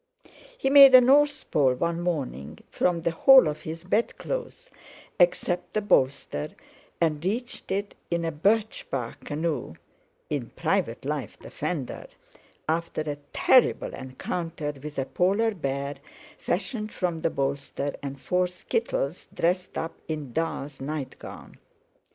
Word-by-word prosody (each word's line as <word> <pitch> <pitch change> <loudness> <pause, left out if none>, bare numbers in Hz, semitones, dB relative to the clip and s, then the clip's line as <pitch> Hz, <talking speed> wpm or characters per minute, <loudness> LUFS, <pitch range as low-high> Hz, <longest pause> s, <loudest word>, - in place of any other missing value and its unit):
He 270 - 0
made 275 -2 +10
a - - +12
North 285 +3 +3
Pole 135 -4 +3
one 170 +5 -1
morning 140 - -3
from 170 -2 +1
the 170 - +1
whole 265 - +7
of 150 0 -3
his 165 +2 -7
bedclothes 480 - -2 0.5
except 175 0 +2
the 215 - +1
bolster, 130 - +1 0.5
and 155 -2 +1
reached 235 +6 -3
it 200 +1 -2 0.2
in 170 -1 0
a 165 - -1
birch 210 +8 0
bark 120 -4 -4
canoe 155 +1 -2 0.5
(in - - -3
private - - -1
life - - -3
the - - -12
fender), 150 -8 -4 0.6
after 165 0 -1
a 150 -2 -3
terrible 255 - +3
encounter 155 +3 -4
with 150 0 -8
a 135 - 0
polar 200 +8 +1
bear 140 -4 -3 0.4
fashioned 210 +4 -2
from 175 -3 -2
the - - +2
bolster 140 +1 -2
and 140 -1 -6
four 180 +7 +1
skittles 180 -3 -2
dressed 180 +2 -1
up 165 +1 -3
in 150 -6 -5
"Da's" 150 -3 -3
nightgown. 145 -1 -7
165 Hz, 135 wpm, -26 LUFS, 145-195 Hz, 0.6 s, a